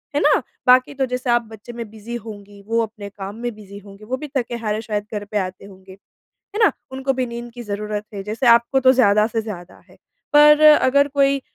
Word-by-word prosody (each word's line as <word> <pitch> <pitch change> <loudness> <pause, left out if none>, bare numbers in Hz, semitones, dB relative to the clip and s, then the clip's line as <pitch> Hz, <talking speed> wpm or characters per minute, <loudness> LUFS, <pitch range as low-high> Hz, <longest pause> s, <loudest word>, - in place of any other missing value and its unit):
है 290 - +1
ना? - - +3 0.3
बाकी 255 +2 +5
तो 270 -1 -1
जैसे 250 0 -4
आप 240 0 +3
बच्चे 220 +2 -11
में 235 -2 -7
बिज़ी 220 +2 -8
होंगी, 205 -3 -10
वो 230 +1 +1
अपने 215 -2 -8
काम 195 0 -8
में 240 +1 -5
बिज़ी 200 -1 -12
होंगे। 200 +1 -14
वो 255 +4 -3
भी 300 - -7
थके-हारे 230 -3 -3
शायद 210 -2 -4
घर 205 -1 -3
पर 210 +1 -4
आते 185 0 -4
होंगे, 190 -1 -15 0.7
है 440 - +4
ना? - - +4 0.2
उनको 265 +1 -1
भी 255 -1 -2
नींद 235 0 -7
की 245 - -8
ज़रूरत 210 0 -4
है, 200 - -5
जैसे 215 +5 -3
आपको, 235 +3 +4
तो 260 0 +5
ज़्यादा 210 -4 +4
से 225 0 -2
ज़्यादा 185 -5 -9
है। - - -19 0.4
पर 300 0 +7
अगर 285 -2 +5
कोई 275 -1 +2
230 Hz, 220 wpm, -20 LUFS, 205-255 Hz, 0.7 s, पर